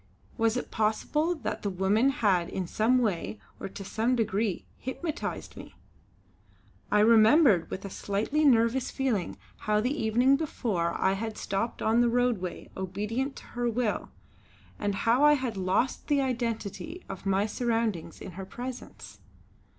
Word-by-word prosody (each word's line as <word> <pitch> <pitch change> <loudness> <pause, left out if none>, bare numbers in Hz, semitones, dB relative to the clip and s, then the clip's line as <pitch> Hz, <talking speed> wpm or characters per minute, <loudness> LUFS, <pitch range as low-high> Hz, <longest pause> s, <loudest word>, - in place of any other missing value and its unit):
Was 225 +1 +1
it - - -5
possible 295 +10 0
that 235 -9 -4
the 205 - -1
woman 195 +7 +2
had 200 -11 +1
in 190 - -3
some 220 +8 +2
way, 170 - -1 0.2
or - - -5
to 195 - -8
some 230 +5 0
degree, 215 -3 -1
hypnotised 305 +5 -4
me. - - -11 1.2
I 210 - +5
remembered 220 - +6
with 195 - -6
a 200 - -6
slightly 215 +13 -1
nervous 245 -1 +3
feeling 245 -10 -1 0.2
how 210 0 +1
the 250 +6 0
evening 245 +2 +3
before 210 - -1
I 190 - +3
had 220 +2 -4
stopped 195 +4 -2
on 225 +2 +3
the 240 - +3
roadway 235 -7 -1
obedient 210 +9 -3
to - - -10
her 240 0 0
will, 235 -2 -1 0.7
and 205 -1 -1
how 235 +7 +2
I 295 0 +7
had 255 -6 -1
lost 190 +7 0
the 290 -2 +3
identity 250 - -3
of 195 - -7
my 195 +1 +2
surroundings 225 -5 -2
in 190 - -7
her 190 +2 -7
presence. 250 +4 -8
225 Hz, 150 wpm, -28 LUFS, 195-250 Hz, 1.2 s, I